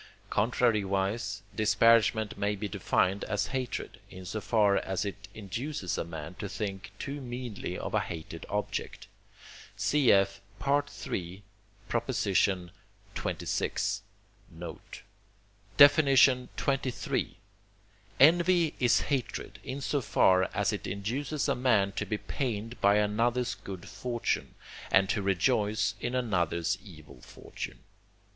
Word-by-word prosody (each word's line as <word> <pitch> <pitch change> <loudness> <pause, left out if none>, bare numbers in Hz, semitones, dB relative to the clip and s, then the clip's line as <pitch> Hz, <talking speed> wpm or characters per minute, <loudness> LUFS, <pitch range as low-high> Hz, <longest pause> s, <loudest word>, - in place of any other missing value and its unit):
Contrariwise, 105 -2 +1
disparagement 110 0 +4
may 105 +1 0
be 105 +1 -4
defined 95 0 0
as 105 - 0
hatred, 130 -2 -3
in 95 0 -10
so 110 +4 -4
far 105 -3 +3
as 95 +1 -2
it 100 +1 -6
induces 110 - -4
a - - -1
man 80 0 -7
to 100 +2 -6
think 100 -2 -4
too 140 +4 -5
meanly 120 -7 -5
of - - -5
a - - +3
hated 80 0 -6
object. 105 0 -3 0.7
Cf. 100 -9 +3 0.3
III. 100 -10 -2 0.5
xxvi. 95 -2 +1 1.8
note. 85 0 -9 0.8
XXIII. 140 -3 +6 1.7
Envy 170 +2 +5
is 120 -2 +4
hatred, 135 -4 -3
in 135 +2 -5
so 140 +1 0
far 95 -5 +4
as - - 0
it - - -4
induces 130 +10 -2
a - - +3
man 110 -6 +2
to - - -3
be 105 - -1
pained 115 -1 -4
by 100 +1 +5
another's 115 +3 +1
good 95 -3 -9
fortune, 120 +5 -2 0.4
and 95 0 +5
to 100 - +1
rejoice 105 +2 +1
in 120 - -2
another's 95 -6 0
evil 75 - -14
fortune. - - -9
105 Hz, 110 wpm, -29 LUFS, 95-125 Hz, 1.8 s, XXIII